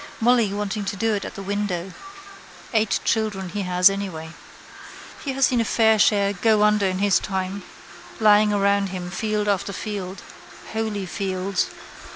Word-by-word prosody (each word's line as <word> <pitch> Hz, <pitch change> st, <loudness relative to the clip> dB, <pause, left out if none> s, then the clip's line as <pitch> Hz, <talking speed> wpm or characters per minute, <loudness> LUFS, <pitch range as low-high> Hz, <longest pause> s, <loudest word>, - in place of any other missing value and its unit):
Molly 235 Hz, -3 st, +3 dB
wanting 205 Hz, +1 st, -3 dB
to 195 Hz, -, -3 dB
do 225 Hz, +3 st, 0 dB
it 200 Hz, -, -2 dB
at -, -, -8 dB
the 195 Hz, -, -7 dB
window. 195 Hz, -2 st, -3 dB, 0.8 s
Eight 220 Hz, -2 st, +2 dB
children 210 Hz, -4 st, -1 dB
he 205 Hz, +4 st, -3 dB
has 180 Hz, -1 st, +4 dB
anyway. 190 Hz, -5 st, -2 dB, 0.9 s
He 275 Hz, -, -2 dB
has 270 Hz, 0 st, +3 dB
seen 245 Hz, -2 st, +1 dB
a -, -, +2 dB
fair 220 Hz, -1 st, +3 dB
share 200 Hz, -1 st, +3 dB
go 215 Hz, +2 st, +2 dB
under 210 Hz, -2 st, +3 dB
in 185 Hz, 0 st, -1 dB
his 200 Hz, 0 st, +3 dB
time, 190 Hz, 0 st, -3 dB, 0.6 s
lying 210 Hz, -1 st, +5 dB
around 200 Hz, -1 st, +2 dB
him 180 Hz, -1 st, -6 dB
field 210 Hz, +1 st, -1 dB
after 200 Hz, -1 st, 0 dB
field. 200 Hz, -2 st, -6 dB, 0.5 s
Holy 220 Hz, -3 st, -2 dB
fields. 190 Hz, 0 st, -2 dB
200 Hz, 160 wpm, -23 LUFS, 190-215 Hz, 0.9 s, lying